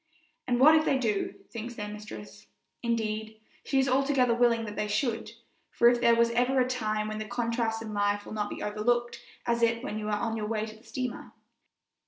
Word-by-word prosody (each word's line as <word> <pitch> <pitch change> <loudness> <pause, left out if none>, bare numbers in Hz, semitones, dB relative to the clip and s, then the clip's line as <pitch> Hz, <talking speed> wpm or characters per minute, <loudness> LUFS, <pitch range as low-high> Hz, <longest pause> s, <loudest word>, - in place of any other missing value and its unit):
And 245 -1 +1
what 300 +4 +8
if 315 0 +5
they 275 - +2
do, 220 -6 -1 0.2
thinks 235 +1 -6
their 210 -2 -5
mistress. 110 - -9 0.3
Indeed, 220 -2 -2 0.2
she 275 - -1
is 265 0 +3
altogether 260 -2 +3
willing 235 -1 +3
that 210 -1 -6
they 210 - -1
should, 225 +1 -1 0.4
for 235 - +5
if 240 0 +1
there 235 -1 +5
is 235 0 +4
ever 250 +3 +2
a 250 - +3
time 215 -4 -1
when 215 0 -4
the 215 - -4
contrasts 230 -1 -1
in 215 -1 -6
life 205 0 0
will - - -8
not 210 -1 -2
be - - -6
overlooked 235 +3 0 0.3
it 235 0 +1
is 230 +1 +2
when 215 -5 -3
you 210 - -4
are 210 -1 0
on 225 0 -1
your 215 -1 -3
way 215 -1 -1
to 215 0 -9
the 220 - -19
steamer. 245 +2 -5
230 Hz, 215 wpm, -29 LUFS, 215-240 Hz, 0.4 s, what